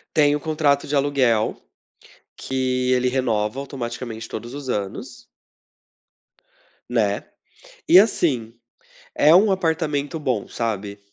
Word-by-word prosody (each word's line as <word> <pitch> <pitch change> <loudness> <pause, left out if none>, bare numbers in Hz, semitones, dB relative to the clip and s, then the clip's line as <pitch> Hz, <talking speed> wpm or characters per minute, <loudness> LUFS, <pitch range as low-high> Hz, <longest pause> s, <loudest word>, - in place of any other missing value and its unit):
Tenho 145 -1 +4
um - - -13
contrato 150 -3 +1
de 145 - -1
aluguel 135 -6 +1 0.8
que 130 -1 -1
ele 125 0 +2
renova 125 -2 0
automaticamente 120 -4 -6
todos 120 +4 -7
os 145 -2 -7
anos. 105 - -4 1.7
Né. - - 0 0.6
E, 185 - +9
assim, 135 - +1 0.6
é 155 +3 +6
um 200 +3 +5
apartamento 160 -4 -1
bom, 130 -8 -2
sabe. 105 -3 -4
130 Hz, 110 wpm, -22 LUFS, 115-150 Hz, 1.7 s, E